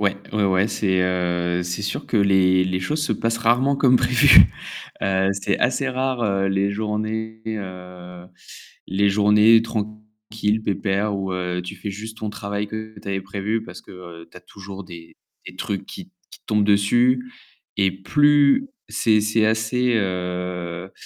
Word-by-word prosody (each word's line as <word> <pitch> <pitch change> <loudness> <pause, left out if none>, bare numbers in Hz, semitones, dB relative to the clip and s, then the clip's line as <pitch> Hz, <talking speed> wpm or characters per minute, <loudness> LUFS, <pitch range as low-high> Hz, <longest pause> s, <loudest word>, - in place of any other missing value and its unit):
Ouais, 100 -1 +1 0.2
ouais, 105 -1 +1
ouais 95 +2 +2
c'est, 95 -3 0
heu, 90 -1 -1
c'est 90 +3 -4
sûr 100 - -4
que - - -1
les 95 -2 +4
les 95 0 -1
choses 150 +10 -2
se - - 0
passent 115 0 -1
rarement 120 +5 +2
comme 130 -2 +4
prévues. 125 -1 +6 0.6
Heu, 95 0 +1
c'est 100 0 -2
assez 130 +2 0
rare, 130 -1 -2
heu, 100 -2 0
les 95 +1 +1
journées, 110 +1 -3
heu, 90 -4 -8 0.6
les 100 +2 +1
journées 105 +2 +5
tranquilles 110 -1 -4
pépères 100 0 -1
où, 95 -1 -3
heu, 90 -1 -3
tu 90 +3 -8
fais 100 +2 -6
juste 110 +3 -8
ton 105 -1 -5
travail 100 0 -4
que 110 +1 -8
tu - - -13
avais 95 -1 -2
prévu 100 +3 -3
parce 90 -5 -11
que, - - -16
heu, 85 -2 -12
tu - - -23
as - - -10
toujours 100 0 -11
des 85 -2 -13 0.3
des - - -10
trucs 100 -2 -4
qui 190 - -9
t 185 - -29 0.2
qui - - -13
te - - -51
tombent 105 -1 +2
dessus 120 +5 +2 0.5
et 95 -1 +2
plus 145 - +3 0.2
c'est 110 -2 +2
c'est 110 +1 +1
assez, 110 +3 +1
heu 90 -2 -3
100 Hz, 170 wpm, -22 LUFS, 95-110 Hz, 0.6 s, prévues